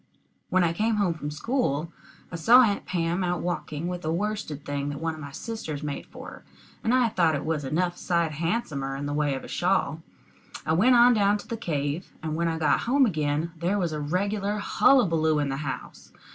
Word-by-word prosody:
When 185 Hz, 0 st, +3 dB
I 165 Hz, -1 st, +1 dB
came 220 Hz, +5 st, +1 dB
home 200 Hz, -5 st, +1 dB
from 150 Hz, -2 st, -5 dB
school, 160 Hz, -, -1 dB, 0.4 s
I -, -, -5 dB
saw 235 Hz, +10 st, +7 dB
Aunt 205 Hz, -4 st, 0 dB
Pam 175 Hz, +1 st, 0 dB
out 175 Hz, -1 st, -1 dB
walking 170 Hz, -2 st, -3 dB
with 180 Hz, 0 st, -4 dB
a 155 Hz, -, -1 dB
worsted 175 Hz, -5 st, -3 dB
thing 145 Hz, 0 st, -2 dB
that 145 Hz, -1 st, -5 dB
one 165 Hz, 0 st, -2 dB
of 155 Hz, -, -10 dB
my 140 Hz, -2 st, -8 dB
sisters 155 Hz, -5 st, -5 dB
made 145 Hz, -1 st, -5 dB
for -, -, -10 dB
her, -, -, -11 dB, 0.4 s
and 225 Hz, -, +1 dB
I 250 Hz, -1 st, +4 dB
thought 170 Hz, -6 st, +2 dB
it 140 Hz, -, -4 dB
was 155 Hz, -2 st, -1 dB
enough 175 Hz, +6 st, -1 dB
sight 170 Hz, -3 st, 0 dB
handsomer 150 Hz, -5 st, -2 dB
in 140 Hz, +1 st, -4 dB
the 145 Hz, -, -3 dB
way 145 Hz, -2 st, +1 dB
of 130 Hz, -, -6 dB
a -, -, -8 dB
shawl. 175 Hz, -4 st, 0 dB, 0.6 s
I 160 Hz, -, +1 dB
went 235 Hz, +10 st, +5 dB
on 240 Hz, +1 st, +7 dB
down 205 Hz, -1 st, +3 dB
to -, -, -12 dB
the 230 Hz, -, -3 dB
cave, 155 Hz, -5 st, -3 dB
and 155 Hz, -1 st, -2 dB
when 170 Hz, +1 st, 0 dB
I 165 Hz, -1 st, -1 dB
got 160 Hz, -, +2 dB
home 275 Hz, +1 st, +5 dB
again 155 Hz, -4 st, -1 dB
there 175 Hz, +5 st, 0 dB
was 175 Hz, -5 st, -1 dB
a 150 Hz, -, -3 dB
regular 200 Hz, +7 st, -1 dB
hullabulloo 165 Hz, -, +3 dB
in 145 Hz, -1 st, 0 dB
the 135 Hz, -, -2 dB
house. 140 Hz, -2 st, -6 dB
165 Hz, 215 wpm, -26 LUFS, 150-205 Hz, 0.6 s, saw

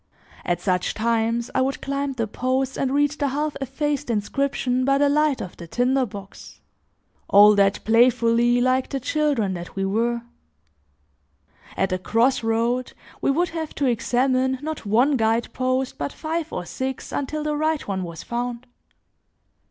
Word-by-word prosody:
At 175 Hz, -1 st, 0 dB
such 180 Hz, 0 st, 0 dB
times, 230 Hz, +1 st, 0 dB
I -, -, +2 dB
would 270 Hz, +1 st, -1 dB
climb 275 Hz, 0 st, -2 dB
the 235 Hz, -3 st, -1 dB
posts 255 Hz, +4 st, -1 dB
and 265 Hz, -, -1 dB
read 290 Hz, +1 st, +2 dB
the 295 Hz, -1 st, -2 dB
half 295 Hz, +2 st, -2 dB
effaced 290 Hz, +1 st, -2 dB
inscription 255 Hz, +3 st, 0 dB
by 275 Hz, +1 st, +3 dB
the 285 Hz, +1 st, +3 dB
light 300 Hz, -1 st, +2 dB
of 180 Hz, -, -7 dB
the 170 Hz, -, -9 dB
tinder 250 Hz, +6 st, +1 dB
box; 200 Hz, -1 st, -11 dB, 0.7 s
all 205 Hz, +1 st, +8 dB
that 200 Hz, -1 st, +2 dB
playfully, 235 Hz, +1 st, +4 dB
like 255 Hz, +1 st, +1 dB
the 275 Hz, -, -2 dB
children 270 Hz, -7 st, 0 dB
that 175 Hz, -1 st, -7 dB
we 195 Hz, 0 st, -1 dB
were. 235 Hz, +4 st, 0 dB, 1.5 s
At 190 Hz, 0 st, +1 dB
a 185 Hz, -, -1 dB
cross 230 Hz, +7 st, +2 dB
road, 230 Hz, +3 st, 0 dB, 0.3 s
we -, -, +1 dB
would 340 Hz, +5 st, +2 dB
have 320 Hz, -2 st, -5 dB
to 285 Hz, -, 0 dB
examine 255 Hz, +2 st, +1 dB
not 310 Hz, -7 st, -5 dB
one 250 Hz, +7 st, +3 dB
guide 225 Hz, +1 st, 0 dB
post, 255 Hz, 0 st, -1 dB
but 145 Hz, 0 st, -2 dB
five 325 Hz, 0 st, -4 dB
or 175 Hz, -, -4 dB
six 260 Hz, +8 st, -5 dB
until 300 Hz, +2 st, -3 dB
the 300 Hz, 0 st, -1 dB
right 310 Hz, 0 st, -1 dB
one 195 Hz, -2 st, -2 dB
was 170 Hz, -2 st, -7 dB
found. 240 Hz, 0 st, -4 dB
255 Hz, 160 wpm, -23 LUFS, 225-275 Hz, 1.5 s, all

